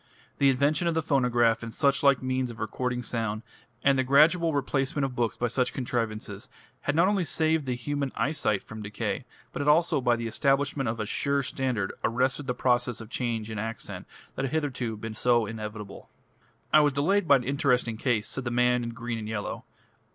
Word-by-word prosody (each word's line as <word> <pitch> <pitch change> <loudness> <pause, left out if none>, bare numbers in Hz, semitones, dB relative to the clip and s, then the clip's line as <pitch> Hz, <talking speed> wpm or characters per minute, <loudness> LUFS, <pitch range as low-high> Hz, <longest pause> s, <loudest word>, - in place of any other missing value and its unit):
The 140 - +5
invention 145 +5 +2
of 170 - +1
the 160 - +1
phonograph 120 -5 +2
and 115 -1 -6
suchlike 140 0 +3
means 130 -1 -1
of 115 - -9
recording 125 -1 -2
sound, 115 -2 -2 0.4
and 135 -1 +4
the - - +3
gradual 160 +5 +4
replacement 135 0 0
of 130 -2 -5
books 120 -2 -1
by 120 - 0
such 125 +2 0
contrivances, 115 -3 -3 0.3
had 145 - -1
not 170 +3 +5
only 200 -2 +2
saved 160 -1 0
the 125 - 0
human 140 +2 -3
eyesight 125 -9 0
from 110 0 -9
decay, 105 0 -3 0.3
but - - -5
had 145 - -2
also 155 -1 +4
by 120 -1 +3
the 115 0 -4
establishment 135 +2 +1
of 115 0 -3
a 110 - -1
sure 140 +6 0
standard 130 -6 -2
arrested 130 +4 0
the 125 - -1
process 125 -1 +1
of 115 0 -10
change 115 -3 -2
in 110 - -4
accent 115 +2 -5 0.3
that 135 - -3
had 135 - -4
hitherto 130 -8 -2
been 110 +1 -6
so 120 0 +2
inevitable. 105 -1 -7 0.6
"I - - +9
was 145 -2 +3
delayed 170 +7 +1
by 140 - +7
an 130 - +1
interesting 125 -4 +1
case," 115 -3 0
said 135 - -5
the 120 - -2
man 125 0 +2
in 115 0 -5
green 120 -1 -4
and 110 0 -6
yellow. 105 -2 -4
125 Hz, 195 wpm, -27 LUFS, 115-140 Hz, 0.6 s, I